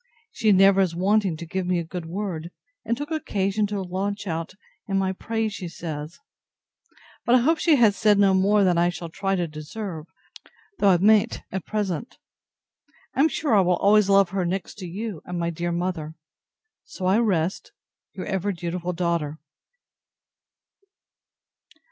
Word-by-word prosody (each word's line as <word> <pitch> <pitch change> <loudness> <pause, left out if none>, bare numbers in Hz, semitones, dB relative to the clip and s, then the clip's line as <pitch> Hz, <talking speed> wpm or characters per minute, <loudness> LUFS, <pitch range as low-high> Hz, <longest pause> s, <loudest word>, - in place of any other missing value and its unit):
She 220 - +2
never 195 0 +6
is 180 -3 0
wanting 195 -1 +1
to 170 - -7
give 185 +2 -3
me 180 -1 +1
a 170 - -1
good 165 0 -7
word, 175 -3 -4 0.3
and 230 +1 -1
took 295 +2 -6
occasion 210 -9 0
to 205 0 -3
launch 195 +3 -3
out 165 0 -4 0.3
in 195 -1 0
my 190 -1 0
praise, 225 +2 -2
she 185 -3 -6
says. 155 -1 -6 1.1
But 240 - +4
I 250 - +5
hope 320 +6 +2
she 325 -3 +4
has 225 -6 +4
said 210 -1 +3
no 200 -1 +4
more 200 +2 +3
than 180 -3 +3
I 175 +1 +3
shall 175 -1 -6
try 195 +3 -1
to 175 -2 -1
deserve, 155 +2 -7 0.7
though 200 - +5
I 180 - +5
mayn't 215 +4 +3
at 190 -2 -5
present. 210 +2 -3 1.0
I - - -5
am 310 +3 +5
sure 295 -4 -1
I 205 - +6
will 180 -1 +2
always 205 0 +4
love 195 -2 +5
her, 195 -1 -1
next 185 +4 -4
to 185 - -6
you 200 0 -5
and 180 - -5
my 170 0 -1
dear 170 +1 -3
mother. 170 -3 -3 0.7
So 185 - -7
I 190 +4 +4
rest 190 -6 0 0.4
Your 185 - -6
ever 195 0 -1
dutiful 175 0 -4
DAUGHTER. 170 -3 -1
190 Hz, 170 wpm, -24 LUFS, 175-210 Hz, 1.1 s, never